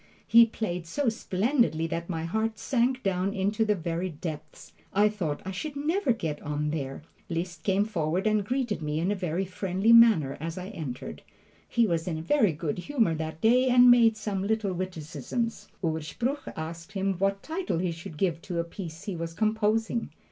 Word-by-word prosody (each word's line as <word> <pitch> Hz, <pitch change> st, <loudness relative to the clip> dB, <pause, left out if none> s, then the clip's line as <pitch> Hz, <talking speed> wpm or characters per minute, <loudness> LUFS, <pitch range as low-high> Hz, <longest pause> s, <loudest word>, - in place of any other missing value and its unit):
He 230 Hz, 0 st, +7 dB
played 180 Hz, -7 st, -4 dB
so 275 Hz, -, 0 dB
splendidly 220 Hz, -, +1 dB
that 170 Hz, +1 st, -4 dB
my 165 Hz, -3 st, -2 dB
heart 220 Hz, +5 st, -1 dB
sank 255 Hz, 0 st, 0 dB
down 195 Hz, +1 st, 0 dB
into 205 Hz, +3 st, +1 dB
the 210 Hz, -1 st, +2 dB
very 170 Hz, +1 st, -2 dB
depths. 155 Hz, -2 st, -8 dB, 0.2 s
I 210 Hz, +2 st, +4 dB
thought 170 Hz, -9 st, -3 dB
I 190 Hz, -, -3 dB
should 285 Hz, +10 st, -5 dB
never 315 Hz, +3 st, +1 dB
get 160 Hz, -10 st, -2 dB
on 150 Hz, 0 st, -2 dB
there! 140 Hz, -2 st, -4 dB, 0.3 s
Liszt 175 Hz, +1 st, -3 dB
came 195 Hz, +1 st, +2 dB
forward 175 Hz, -2 st, -1 dB
and 215 Hz, -1 st, +2 dB
greeted 245 Hz, -3 st, -1 dB
me 150 Hz, 0 st, -1 dB
in 180 Hz, +5 st, +1 dB
a -, -, +1 dB
very 180 Hz, 0 st, -2 dB
friendly 190 Hz, +4 st, +1 dB
manner 215 Hz, -13 st, +6 dB
as 165 Hz, +2 st, -5 dB
I 185 Hz, +1 st, -5 dB
entered. 155 Hz, -, -6 dB, 0.5 s
He 235 Hz, -1 st, +3 dB
was 170 Hz, -4 st, -1 dB
in 165 Hz, -3 st, -1 dB
a -, -, -4 dB
very 220 Hz, -, +3 dB
good 155 Hz, +1 st, -3 dB
humor 230 Hz, -, +1 dB
that 160 Hz, 0 st, -5 dB
day, 250 Hz, +3 st, +4 dB
and 245 Hz, 0 st, +8 dB
made 230 Hz, -2 st, +5 dB
some 205 Hz, -3 st, -2 dB
little 205 Hz, -1 st, 0 dB
witticisms. 180 Hz, -, -4 dB, 0.2 s
Urspruch 165 Hz, -, -2 dB
asked 165 Hz, +3 st, -7 dB
him 195 Hz, 0 st, 0 dB
what 195 Hz, 0 st, 0 dB
title 335 Hz, -, -2 dB
he 175 Hz, 0 st, 0 dB
should 165 Hz, 0 st, -8 dB
give 170 Hz, -2 st, 0 dB
to 175 Hz, -1 st, -5 dB
a 170 Hz, -, +1 dB
piece 170 Hz, -2 st, -8 dB
he 200 Hz, -4 st, -4 dB
was 165 Hz, 0 st, -5 dB
composing. 220 Hz, +2 st, +1 dB
190 Hz, 185 wpm, -28 LUFS, 165-225 Hz, 0.5 s, and